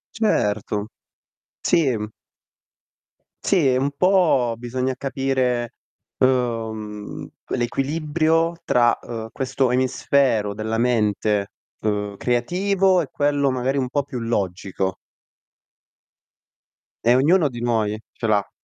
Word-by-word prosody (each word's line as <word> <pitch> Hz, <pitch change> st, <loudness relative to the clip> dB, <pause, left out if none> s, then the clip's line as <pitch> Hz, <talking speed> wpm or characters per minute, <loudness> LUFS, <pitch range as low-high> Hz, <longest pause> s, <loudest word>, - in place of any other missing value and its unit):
Certo. 105 Hz, -, 0 dB, 0.7 s
Sì. 115 Hz, -9 st, +1 dB, 1.3 s
Sì, 170 Hz, -8 st, +3 dB
e 125 Hz, -, +2 dB
un 140 Hz, +2 st, 0 dB
po' 175 Hz, -10 st, +3 dB
bisogna 125 Hz, +2 st, -2 dB
capire, 130 Hz, -3 st, -1 dB, 0.5 s
uhm, 110 Hz, -5 st, -1 dB, 0.3 s
l'equilibrio 155 Hz, +6 st, +1 dB
tra, 120 Hz, -5 st, +3 dB
uhm, 115 Hz, -2 st, -6 dB
questo 130 Hz, -1 st, 0 dB
emisfero 125 Hz, -3 st, +2 dB
della 110 Hz, +2 st, -3 dB
mente, 105 Hz, -3 st, +1 dB, 0.3 s
uhm, 105 Hz, -1 st, -2 dB
creativo 185 Hz, +9 st, +2 dB
e 155 Hz, -, -3 dB
quello 145 Hz, -1 st, +1 dB
magari 130 Hz, +2 st, 0 dB
un 130 Hz, -2 st, 0 dB
po' 140 Hz, +3 st, 0 dB
più 130 Hz, -2 st, -6 dB
logico. 95 Hz, -4 st, -2 dB, 2.1 s
E 120 Hz, +1 st, +5 dB
ognuno 155 Hz, +5 st, +4 dB
di 120 Hz, -3 st, -7 dB
noi 110 Hz, -3 st, 0 dB
ce 115 Hz, -, -4 dB
l'ha. 105 Hz, -2 st, +1 dB
125 Hz, 100 wpm, -22 LUFS, 110-140 Hz, 2.1 s, E